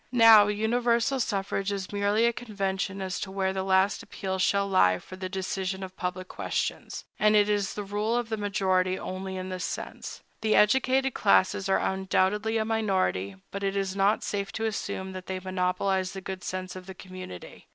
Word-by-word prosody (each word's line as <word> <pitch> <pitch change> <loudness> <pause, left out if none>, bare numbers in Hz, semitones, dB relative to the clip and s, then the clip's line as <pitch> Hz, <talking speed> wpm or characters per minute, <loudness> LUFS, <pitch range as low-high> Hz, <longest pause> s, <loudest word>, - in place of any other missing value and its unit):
Now, 225 -4 +8
universal 235 +4 +1
suffrage 200 -3 -1
is 195 0 -4
merely 205 +3 +2
a 235 - +3
convention 195 -4 -3
as 185 -1 -3
to 190 - -4
where 190 0 -1
the 190 - -2
last 190 +1 +2
appeal 190 -2 -4
shall 200 +2 +2
lie 95 - +4
for 185 - -11
the 185 0 -5
decision 190 0 -3
of 185 0 -8
public 185 0 -4
questions; - - -3
and 210 0 +4
it 205 -1 +5
is 205 -2 0
the 210 - -3
rule 210 +3 -1
of 240 -2 -2
the 220 - 0
majority 190 -3 +1
only 190 0 -5
in 185 0 -5
this 185 -1 -4
sense. - - -6 0.2
The 220 -1 +2
educated 265 +4 +3
classes 195 -1 +3
are 190 - +4
undoubtedly 190 +3 +1
a 220 - 0
minority; 190 - 0 0.2
but 200 - -5
it 195 0 -1
is 195 -1 -1
not 200 +2 +2
safe 200 -1 -3
to 225 - -2
assume 200 -3 -3
that 185 -1 -8
they 190 -1 -3
monopolize 185 0 -1
the 195 - -5
good 190 -1 -6
sense 185 0 -4
of 185 0 -9
the 190 - -8
community. 185 - -10
195 Hz, 190 wpm, -27 LUFS, 185-210 Hz, 0.2 s, Now